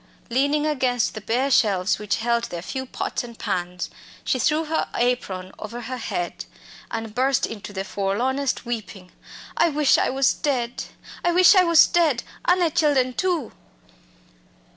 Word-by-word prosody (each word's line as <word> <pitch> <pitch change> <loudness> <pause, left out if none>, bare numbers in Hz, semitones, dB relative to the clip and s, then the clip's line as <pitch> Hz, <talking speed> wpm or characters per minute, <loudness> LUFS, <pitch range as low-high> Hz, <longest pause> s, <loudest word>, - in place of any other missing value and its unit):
Leaning 285 +4 +2
against 255 -6 0
the 215 - -7
bare 250 +6 0
shelves 200 -6 +2
which 210 -1 -1
held 235 +1 0
their 170 -1 -6
few 265 +5 -5
pots - - -3
and 235 -1 -10
pans, 180 0 -3 0.4
she 255 - 0
threw 305 +6 +2
her 315 +1 -1
apron 195 -7 -1
over 230 +3 -6
her 255 +2 -5
head 175 -7 -4 0.4
and 225 -1 -5
burst 260 +2 +2
into 210 -2 -8
the 190 -1 -4
forlornest 240 +9 -1
weeping. 210 -6 -6 0.4
"I 340 - +3
wish 300 -2 +3
I - - +1
was 265 0 +2
dead; 245 -4 -2 0.4
I 350 - +3
wish 360 +3 +7
I 375 -2 +6
was 335 -2 +7
dead, 315 -8 +2 0.2
an' 360 - +4
the 335 -2 +2
chillen 285 -6 +2
too!" 350 -9 -1
250 Hz, 160 wpm, -23 LUFS, 215-290 Hz, 0.4 s, wish